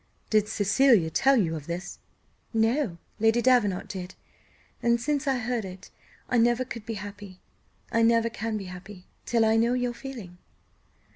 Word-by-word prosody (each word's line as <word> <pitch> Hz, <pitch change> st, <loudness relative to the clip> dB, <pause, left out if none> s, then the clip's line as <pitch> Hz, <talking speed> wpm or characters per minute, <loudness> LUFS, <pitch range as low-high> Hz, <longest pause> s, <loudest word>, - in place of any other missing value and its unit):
"Did 215 Hz, -1 st, +3 dB
Cecilia 205 Hz, -3 st, +3 dB
tell 270 Hz, -, +4 dB
you 170 Hz, -9 st, +1 dB
of 150 Hz, -2 st, -8 dB
this?" 175 Hz, +2 st, -5 dB, 0.6 s
"No, 225 Hz, -, +1 dB, 0.2 s
Lady 225 Hz, +2 st, +3 dB
Davenant 240 Hz, -7 st, +2 dB
did; 185 Hz, -2 st, -7 dB, 0.7 s
and 235 Hz, 0 st, +2 dB
since 285 Hz, +3 st, -1 dB
I 265 Hz, -1 st, +2 dB
heard 240 Hz, -1 st, -2 dB
it 185 Hz, 0 st, -10 dB, 0.4 s
I 245 Hz, -, +2 dB
never 240 Hz, +2 st, +3 dB
could 230 Hz, -3 st, -8 dB
be 225 Hz, -, -3 dB
happy 200 Hz, -2 st, -9 dB, 0.5 s
I 230 Hz, -, +2 dB
never 230 Hz, 0 st, +4 dB
can 225 Hz, -1 st, -3 dB
be 200 Hz, -, -6 dB
happy 180 Hz, +1 st, -10 dB, 0.2 s
till 230 Hz, -2 st, +3 dB
I 220 Hz, 0 st, +3 dB
know 235 Hz, +2 st, +3 dB
your 245 Hz, -1 st, -1 dB
feeling." 235 Hz, -10 st, -9 dB
225 Hz, 160 wpm, -27 LUFS, 195-240 Hz, 0.7 s, tell